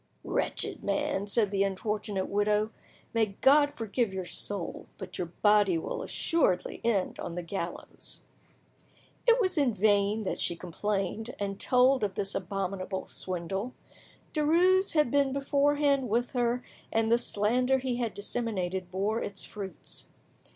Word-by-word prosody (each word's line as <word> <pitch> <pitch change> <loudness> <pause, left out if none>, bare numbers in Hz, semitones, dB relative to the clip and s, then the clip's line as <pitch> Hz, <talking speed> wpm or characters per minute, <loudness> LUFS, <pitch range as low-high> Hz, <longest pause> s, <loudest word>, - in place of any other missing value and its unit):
"Wretched - - -2
man," 290 -9 0
said 205 -1 +2
the 195 -1 +1
unfortunate 200 0 -1
widow, 210 +1 +1 0.4
"may 220 -4 +1
God 285 +1 +6
forgive 225 -1 -1
your 190 -1 -4
soul; 195 0 -2
but - - -7
your 180 - -1 0.2
body 205 -4 +5
will 160 - -4
assuredly 320 - 0
end 210 -5 0
on 170 - -5
the 175 - -3
gallows!" 170 0 -6 1.1
It 470 +1 +6
was 370 -7 +2
in 255 -6 +2
vain 205 +1 +3
that 190 - -3
she 170 - 0
complained, 200 +5 -3
and 195 -1 -3
told 255 0 +4
of 195 -2 -1
this 200 -2 -2
abominable 190 0 -3
swindle; 190 +6 -4 0.6
Derues 355 +5 +4
had 300 -6 +3
been 280 -2 +3
beforehand 280 -1 +2
with 240 +3 +1
her, 245 0 0 0.3
and 225 0 +1
the 235 - +5
slander 250 +6 +2
he 255 -2 -2
had 235 -3 -2
disseminated 190 -5 -2
bore 200 +5 -1
its 200 -2 -2
fruits. 195 -4 -6
210 Hz, 140 wpm, -29 LUFS, 195-255 Hz, 1.1 s, God